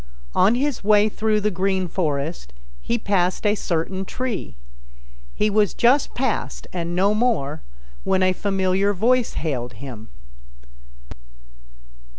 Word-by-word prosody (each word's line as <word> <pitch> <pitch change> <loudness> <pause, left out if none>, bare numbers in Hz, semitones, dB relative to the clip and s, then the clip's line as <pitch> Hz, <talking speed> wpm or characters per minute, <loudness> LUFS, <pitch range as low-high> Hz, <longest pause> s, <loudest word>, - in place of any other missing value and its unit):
On 200 +6 +4
his 275 -1 -1
way 210 +1 +4
through 215 0 0
the 210 +1 +1
Green 190 0 0
Forest 150 - -3 0.3
he 235 - -1
passed 190 -3 0
a 205 - +4
certain 185 -1 -2
tree. 220 - -4 0.8
He 210 - +1
was 210 -1 +2
just 260 +4 +3
past 255 -3 -2
and 175 -1 -3
no 195 +3 +3
more 210 - 0 0.4
when 190 -1 +2
a 185 0 +3
familiar 195 +1 +1
voice 240 +5 +2
hailed 125 -6 -3
him. 115 -1 -9
195 Hz, 125 wpm, -22 LUFS, 170-215 Hz, 0.8 s, On